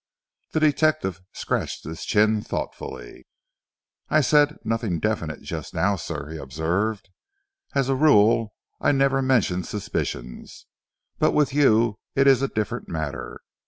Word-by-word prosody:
The 155 Hz, -, +2 dB
detective 155 Hz, -, +1 dB
scratched -, -, -3 dB
his 80 Hz, +2 st, -7 dB
chin 110 Hz, 0 st, +3 dB
thoughtfully. -, -, -6 dB, 0.8 s
"I 155 Hz, -, +4 dB
said 150 Hz, +2 st, +3 dB
'nothing 110 Hz, -6 st, -1 dB
definite' 85 Hz, -7 st, -2 dB
just -, -, -6 dB
now, 100 Hz, +2 st, +2 dB
sir," 80 Hz, -4 st, -6 dB
he 80 Hz, -, -6 dB
observed. 85 Hz, +10 st, -2 dB, 0.7 s
"As 135 Hz, -2 st, +2 dB
a 135 Hz, -, +2 dB
rule, 115 Hz, -6 st, +4 dB, 0.2 s
I -, -, +2 dB
never 135 Hz, 0 st, +2 dB
mention 115 Hz, -9 st, +1 dB
suspicions, 60 Hz, -12 st, -5 dB, 0.5 s
but -, -, +3 dB
with 145 Hz, -3 st, +2 dB
you 115 Hz, -6 st, +3 dB, 0.2 s
it 135 Hz, -, +4 dB
is 135 Hz, -2 st, +5 dB
a 135 Hz, -, +1 dB
different 115 Hz, +1 st, -3 dB
matter. 80 Hz, -3 st, -5 dB
110 Hz, 130 wpm, -24 LUFS, 90-135 Hz, 0.8 s, is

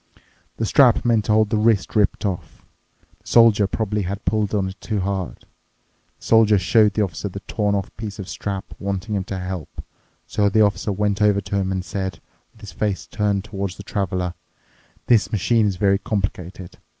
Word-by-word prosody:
The 115 Hz, -, -1 dB
strap 125 Hz, +1 st, +4 dB
meant 115 Hz, -3 st, +2 dB
to -, -, 0 dB
hold 110 Hz, -1 st, +3 dB
the 110 Hz, -, +2 dB
wrist 110 Hz, -3 st, +2 dB
ripped 105 Hz, 0 st, +2 dB
off. 95 Hz, -4 st, -5 dB, 0.5 s
The -, -, -22 dB
Soldier 115 Hz, -4 st, +5 dB
probably 105 Hz, 0 st, -2 dB
had 100 Hz, +2 st, -5 dB
pulled 105 Hz, -2 st, 0 dB
on 95 Hz, -2 st, 0 dB
it 95 Hz, +1 st, -12 dB
too 105 Hz, -3 st, -2 dB
hard. 95 Hz, -2 st, -3 dB, 0.8 s
The -, -, -16 dB
Soldier 110 Hz, -2 st, +5 dB
showed 105 Hz, +2 st, +3 dB
the 110 Hz, -, +2 dB
Officer 95 Hz, +1 st, -4 dB
the 100 Hz, +2 st, -8 dB
torn 105 Hz, -1 st, -1 dB
off 100 Hz, -2 st, -4 dB
piece 110 Hz, -1 st, -6 dB
of 100 Hz, -3 st, -7 dB
strap, 100 Hz, 0 st, -5 dB
wanting 100 Hz, +2 st, -3 dB
him 100 Hz, -2 st, 0 dB
to 95 Hz, -, -4 dB
help. 90 Hz, -3 st, -6 dB, 0.4 s
So 100 Hz, -1 st, +1 dB
the 110 Hz, +2 st, +3 dB
Officer 105 Hz, 0 st, 0 dB
went 100 Hz, +1 st, -1 dB
over 105 Hz, -1 st, +4 dB
to 100 Hz, -, -5 dB
him 95 Hz, -1 st, 0 dB
and 95 Hz, -1 st, -2 dB
said, 95 Hz, -3 st, -4 dB, 0.3 s
with 110 Hz, -, -23 dB
his 105 Hz, -3 st, -9 dB
face 100 Hz, +3 st, -2 dB
turned 100 Hz, -2 st, -1 dB
towards 100 Hz, -3 st, -5 dB
the 100 Hz, -, -9 dB
Traveler, 90 Hz, -3 st, -2 dB, 0.7 s
"The 115 Hz, -4 st, +4 dB
machine 110 Hz, +1 st, +2 dB
is 100 Hz, -, -1 dB
very 100 Hz, 0 st, +2 dB
complicated. 95 Hz, -3 st, -4 dB
100 Hz, 190 wpm, -22 LUFS, 95-105 Hz, 0.8 s, Soldier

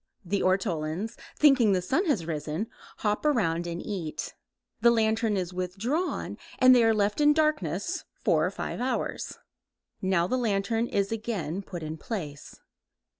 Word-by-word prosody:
The 195 Hz, +3 st, 0 dB
ortolans, 185 Hz, +2 st, 0 dB, 0.2 s
thinking 265 Hz, -8 st, +5 dB
the 185 Hz, -, +2 dB
sun 290 Hz, -, +1 dB
has 245 Hz, -, +1 dB
risen, 155 Hz, +3 st, -3 dB, 0.3 s
hop 210 Hz, -1 st, 0 dB
around 175 Hz, -, +1 dB
and 170 Hz, 0 st, -4 dB
eat. 175 Hz, -7 st, -4 dB, 0.5 s
The 235 Hz, -, +7 dB
lantern 220 Hz, -2 st, +2 dB
is 180 Hz, -1 st, -3 dB
withdrawn 205 Hz, -, -2 dB, 0.2 s
and 255 Hz, 0 st, +7 dB
they 240 Hz, -, +5 dB
are 225 Hz, -, +5 dB
left 210 Hz, +4 st, +1 dB
in 295 Hz, 0 st, +6 dB
darkness 250 Hz, -, 0 dB
four 155 Hz, -2 st, +2 dB
or 175 Hz, -, +2 dB
five 200 Hz, -, -5 dB
hours. 260 Hz, +1 st, -2 dB, 0.6 s
Now 185 Hz, -2 st, +2 dB
the 255 Hz, +8 st, 0 dB
lantern 225 Hz, +1 st, 0 dB
is 200 Hz, -2 st, 0 dB
again 200 Hz, -7 st, -3 dB
put 175 Hz, -4 st, -7 dB
in 155 Hz, +1 st, -5 dB
place. 160 Hz, -, -6 dB
200 Hz, 150 wpm, -28 LUFS, 175-235 Hz, 0.6 s, The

